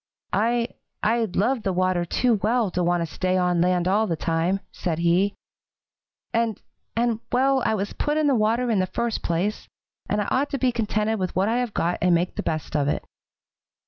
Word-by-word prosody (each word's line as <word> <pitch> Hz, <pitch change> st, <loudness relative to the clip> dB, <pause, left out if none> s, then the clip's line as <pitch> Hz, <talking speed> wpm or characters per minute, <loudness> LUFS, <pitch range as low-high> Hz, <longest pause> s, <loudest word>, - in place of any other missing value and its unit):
'I 235 Hz, +2 st, +1 dB, 0.3 s
I 230 Hz, +1 st, +2 dB
love 235 Hz, +5 st, +1 dB
the 195 Hz, -, -1 dB
water 185 Hz, -1 st, +1 dB
too 230 Hz, +5 st, +1 dB
well 220 Hz, -1 st, +1 dB
to 180 Hz, -, -1 dB
want 175 Hz, 0 st, +2 dB
to -, -, 0 dB
stay 185 Hz, 0 st, 0 dB
on 180 Hz, -1 st, +2 dB
land 180 Hz, 0 st, +2 dB
all 210 Hz, +4 st, +2 dB
the 165 Hz, -, 0 dB
time,' 165 Hz, +4 st, 0 dB
said 165 Hz, -3 st, -2 dB
he, 175 Hz, +4 st, +2 dB, 1.0 s
'and 230 Hz, -2 st, 0 dB, 0.4 s
and 230 Hz, -1 st, +1 dB
well, 265 Hz, +1 st, +3 dB
I 220 Hz, -, +2 dB
was 205 Hz, 0 st, -3 dB
put 295 Hz, 0 st, -1 dB
in 310 Hz, -, +2 dB
the 285 Hz, -, +4 dB
water 230 Hz, +2 st, +2 dB
in 210 Hz, -, +2 dB
the 185 Hz, -, +1 dB
first 230 Hz, +5 st, -2 dB
place, 175 Hz, +5 st, -1 dB, 0.4 s
and 210 Hz, -, +1 dB
I 205 Hz, -, 0 dB
ought 280 Hz, +3 st, +1 dB
to 275 Hz, -, -2 dB
be 255 Hz, -1 st, +2 dB
contented 220 Hz, -1 st, 0 dB
with 185 Hz, -1 st, -2 dB
what 190 Hz, +2 st, +2 dB
I 235 Hz, -, +1 dB
have 245 Hz, -4 st, -2 dB
got 175 Hz, +1 st, 0 dB
and 180 Hz, -1 st, +4 dB
make 175 Hz, +2 st, -1 dB
the 210 Hz, -, -2 dB
best 155 Hz, -5 st, -3 dB
of 145 Hz, -2 st, +2 dB
it.' -, -, -1 dB
205 Hz, 210 wpm, -24 LUFS, 180-235 Hz, 1.0 s, the